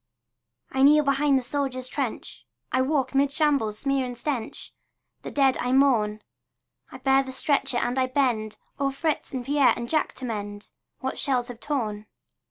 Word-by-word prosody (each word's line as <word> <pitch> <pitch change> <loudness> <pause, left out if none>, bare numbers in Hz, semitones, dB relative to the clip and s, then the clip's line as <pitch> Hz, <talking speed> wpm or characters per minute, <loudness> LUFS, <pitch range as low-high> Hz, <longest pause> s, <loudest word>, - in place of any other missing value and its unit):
I 265 - 0
kneel 300 +2 +6
behind 280 0 +3
the 260 - -1
soldier's 260 -2 -2
trench, 265 -4 -4 0.3
I 255 - +2
walk 270 0 0
'mid 275 +1 +3
shambles' 280 -9 +1
smear 275 +2 0
and 245 -1 -5
stench, 240 -3 -4 0.5
The - - -6
dead 270 -2 +2
I 250 +1 0
mourn; 225 -6 +3 0.7
I - - -8
bear 270 0 +3
the 265 -1 -7
stretcher 270 -1 0
and 245 +2 0
I 255 - +2
bend 245 -5 0 0.2
O'er 275 -1 +1
Fritz 305 +3 -2
and 255 -2 -4
Pierre 280 -1 +4
and 235 - -5
Jack 310 +4 0
to 260 - -7
mend 205 -3 -5 0.3
What 265 - -3
shells 250 -3 0
have 240 -2 -8
torn. 215 -8 -3
265 Hz, 175 wpm, -25 LUFS, 240-280 Hz, 0.7 s, kneel